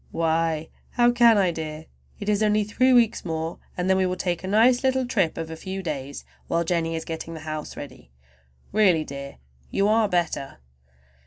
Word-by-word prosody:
"Why, 160 -1 0 0.2
how 240 -1 +4
can 235 -2 +5
I, 190 -3 +3
dear? 155 -1 -6 0.3
It 205 - -6
is 210 0 +1
only 210 0 +3
three 255 +5 +2
weeks 235 -2 +3
more 160 -1 -4 0.2
and 180 0 -1
then 190 0 +3
we 190 -1 +2
will 180 - -1
take 175 -1 -2
a - - -4
nice 240 +6 +4
little 260 -1 +2
trip 195 -9 0
of 165 0 -5
a - - -5
few 190 +3 -6
days 140 -4 -5 0.2
while 170 0 +1
Jennie 165 -1 -1
is 160 - -4
getting 165 0 -6
the 160 - -8
house 155 -1 -6
ready. - - -10 0.6
Really, 190 -7 +4
dear, 140 -1 -8 0.3
you 200 +1 +1
are 215 0 +3
better!" 170 -6 -1
180 Hz, 190 wpm, -24 LUFS, 160-210 Hz, 0.6 s, can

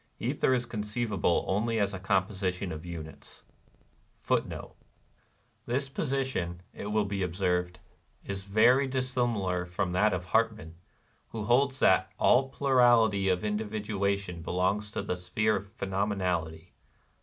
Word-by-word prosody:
Ether - - +1
is 125 -1 +1
conceivable 105 -5 -1
only 110 +4 0
as 100 -1 +1
a 95 - -5
composition 95 -1 -1
of 80 +2 -7
units. 80 -3 -9 0.8
^ - - -25 0.2
1 - - -8 0.9
This 135 +3 -1
position, 130 - -2
it - - -7
wUl 105 0 +1
be 100 0 -3
observed, 90 0 -1 0.5
is 100 -1 -4
very 115 +7 +4
dissimilar 120 -8 -1
from 90 +1 -2
that 105 +4 +3
of 90 -2 -3
Hartmann, 110 -4 0 0.5
who 110 -2 -5
holds 130 +5 +2
that 95 -3 +3
' - - -40
' - - -39
all 135 +2 +4
plurality 120 -8 +4
of 90 +1 +1
individuation 105 -4 -2
belongs 95 +5 0
to - - -4
the 90 - -2
sphere 100 +5 0
of 100 +4 -10
phenomenality." 90 -5 -2
100 Hz, 135 wpm, -29 LUFS, 90-115 Hz, 0.9 s, very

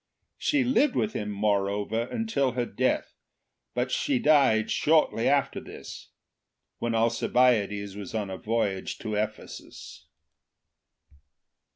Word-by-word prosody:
She 295 -4 +2
lived 260 +3 +2
with 215 - 0
him, 105 -1 -3
moreover, 105 +2 0
until 180 - -1
her 125 -1 -1
death, 130 +4 -1 0.6
but 125 +1 -1
she 280 - +1
died 140 - +3
shortly 150 -7 +2
after 140 -1 +1
this, - - -10 0.7
when 120 -1 -1
Alcibiades 110 -3 +2
was 100 0 -7
on 105 -3 -2
a 95 - -5
voyage 105 -4 -2
to 110 -1 -5
Ephesus. 105 +1 -6
115 Hz, 110 wpm, -27 LUFS, 105-140 Hz, 0.7 s, died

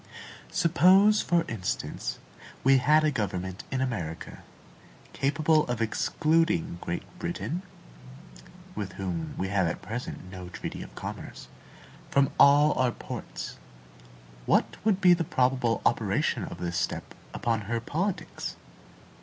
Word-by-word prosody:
Suppose, 185 +5 +5
for 170 -1 +2
instance, 105 -6 -3 0.5
we 135 0 +6
had 150 +4 +4
a 155 - +3
government 95 -6 -3
in 130 - -1
America, 90 -11 -4 0.7
capable 150 +3 +2
of 120 -1 -2
excluding 155 - +1
Great 85 - -3 0.2
Britain 175 0 -3 1.1
(with 100 - -5
whom 85 -4 -4
we 95 - -2
have 95 -3 +2
at 80 - -4
present 110 -5 -6
no 90 -2 -8
treaty - - -6
of - - -10
commerce) - - -7 0.6
from 140 0 +3
all 145 +1 +7
our 130 -1 +3
ports; - - -7 0.9
what - - +3
would 200 -2 +2
be 180 -2 +7
the 170 -1 +1
probable 125 -4 +1
operation - - +1
of - - -8
this 85 0 -3
step 90 - -2 0.2
upon 115 -2 -1
her 115 0 0
politics? 170 - -3
130 Hz, 125 wpm, -28 LUFS, 95-155 Hz, 1.1 s, all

